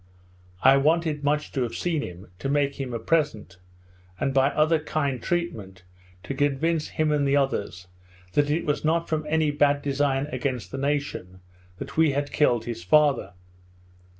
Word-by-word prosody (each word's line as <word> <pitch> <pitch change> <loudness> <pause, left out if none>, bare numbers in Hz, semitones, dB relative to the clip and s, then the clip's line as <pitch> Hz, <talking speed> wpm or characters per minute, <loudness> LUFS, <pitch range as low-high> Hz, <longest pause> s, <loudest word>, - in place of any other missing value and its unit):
I 135 +1 +7
wanted 155 +1 +1
much 150 +1 0
to 135 - -2
have 120 -2 -2
seen 165 -4 -1
him, 90 -4 -9
to 135 - -3
make 140 0 0
him 135 -2 -4
a 120 - -2
present, 115 - -1 0.6
and, 135 - 0
by 135 0 +4
other 155 +2 +2
kind 140 -5 -2
treatment, 110 - -3 0.4
to 90 - -4
convince 150 +3 0
him 155 -1 0
and 145 -2 +1
the 140 - +2
others 100 -10 -1 0.5
that 145 0 +2
it 155 +3 0
was 145 0 -1
not 165 +2 +1
from 155 -1 -2
any 155 -1 +2
bad 145 0 +2
design 140 -1 0
against 130 -4 -3
the 135 - -5
nation, 140 -10 -3 0.4
that - - -8
we 160 -3 +4
had 145 +1 -2
killed 120 -6 +2
his 115 -7 -5
father. 135 - +3
145 Hz, 170 wpm, -25 LUFS, 130-150 Hz, 0.6 s, I